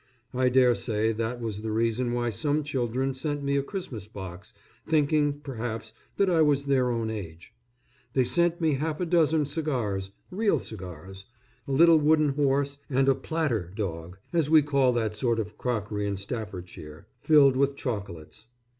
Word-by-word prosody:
I 130 0 +2
dare 125 -1 +5
say 110 -1 0
that 115 +2 -3
was 110 -3 -4
the 110 0 -3
reason 115 +2 0
why 120 -1 0
some 150 +5 0
children 130 -1 -1
sent 145 +2 -3
me 140 0 0
a 140 - +2
Christmas 135 - -6
box 100 -1 -9 0.4
thinking, 145 -2 +2
perhaps, 115 -4 -5 0.2
that 200 - +3
I 170 -3 +3
was 145 -2 +3
their 130 -3 +2
own 115 -2 -1
age. 85 -6 -8 0.6
They 130 - +3
sent 170 +7 +1
me 160 -3 +2
half 150 +3 -2
a 180 - 0
dozen 160 -3 +3
cigars 125 - -2 0.2
real 205 +3 +2
cigars; 95 -1 -8 0.4
a - - -4
little 165 +3 +6
wooden 155 0 +3
horse, 140 0 0
and 135 0 +2
a 135 - +6
"platter" 130 - -2
dog, 90 -4 -5 0.2
as 165 -4 +1
we 155 -1 +6
call 140 -3 +3
that 110 -3 -1
sort 120 0 0
of 105 -1 -4
crockery 105 -4 -2
in 100 - -1
Staffordshire, 95 -7 -7
filled 140 -2 +5
with 140 +1 +1
chocolates. 105 - -6
125 Hz, 165 wpm, -27 LUFS, 110-145 Hz, 0.6 s, little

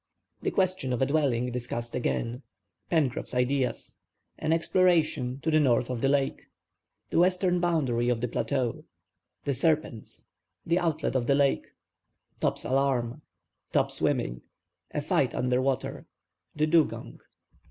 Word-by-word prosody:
THE - - 0
QUESTION 185 -9 0
OF 125 - +1
A - - +4
DWELLING 130 -4 +1
DISCUSSED 120 -1 -4
AGAIN—PENCROFF'S 125 +3 -2
IDEAS—AN 130 +4 -2
EXPLORATION 160 -6 +2
TO 160 - +1
THE 155 - +5
NORTH 125 -3 +2
OF 120 -2 -3
THE 135 - +2
LAKE—THE 140 +3 -3
WESTERN 180 0 +3
BOUNDARY 135 -9 +1
OF 120 -2 +1
THE 125 - -1
PLATEAU—THE 130 +2 -4
SERPENTS—THE 155 +3 -2
OUTLET 160 -5 -1
OF 120 -2 +1
THE 140 - +4
LAKE—TOP'S 140 -1 -3
ALARM—TOP 135 0 -1
SWIMMING—A - - -4
FIGHT - - +1
UNDER 125 0 +1
WATER—THE 135 +3 -4
DUGONG. 160 0 +1
135 Hz, 105 wpm, -28 LUFS, 125-155 Hz, -, THE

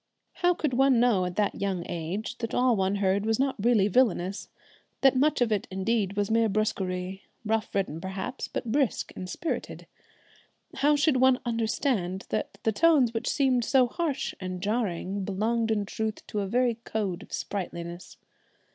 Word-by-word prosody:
How 355 -1 +3
could 300 -6 -1
one 265 -1 +4
know 230 -7 +3
at 180 0 -4
that 210 -1 +1
young 190 -3 -1
age 185 +8 -4
that 230 -2 -3
all 250 -1 +3
one 190 0 +1
heard 200 0 +1
was 220 0 +1
not 265 -6 0
really 225 -4 +4
villainous, 200 -4 +1 0.5
that 270 -1 +5
much 285 +1 +2
of 235 -2 +2
it 205 -2 0
indeed 195 +1 -1
was 205 +1 0
mere 225 0 +3
brusquerie, 190 -2 -2 0.2
rough 220 +1 -1
ridden 175 -5 -1
perhaps, 190 +7 -4
but 230 - -4
brisk 275 -2 0
and 185 -1 -6
spirited? 330 - -4 0.9
How 290 +2 +4
should 290 -2 +3
one 260 0 +4
understand 225 -5 -1
that - - -3
the 220 - +2
tones 275 -2 +4
which 225 - -2
seemed 260 -3 +2
so 260 +1 +4
harsh 285 +2 -2
and 185 -1 -5
jarring 200 -2 -2
belonged 220 +4 0
in 210 -2 +1
truth 220 +1 -4
to 210 - -3
a 200 - -1
very 240 +2 +1
code 200 -6 -2
of - - -14
sprightliness? 175 -3 -5
220 Hz, 170 wpm, -27 LUFS, 190-250 Hz, 0.9 s, that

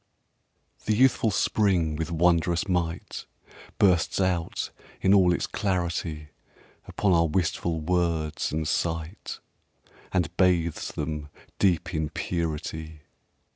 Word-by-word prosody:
IX - - -26
The 110 - +2
youthful 125 -1 +4
spring 95 -6 +1
with 80 +2 -3
wondrous 85 +1 +2
might 85 -3 -2 0.5
Bursts 90 -3 +3
out 90 -3 -1 0.3
in 95 - +4
all 95 -3 +6
its 90 - 0
clarity 85 -5 -2 0.6
Upon 100 -3 +1
our 85 -1 +4
wistful 85 0 -1
words 80 -2 0
and 80 +1 -2
sight, 80 +3 -2 0.7
And 90 -4 0
bathes 85 -3 +2
them 75 -1 -4 0.3
deep 90 -1 +2
in 80 -2 -1
purity. 80 -2 -4
85 Hz, 110 wpm, -26 LUFS, 80-90 Hz, 0.7 s, all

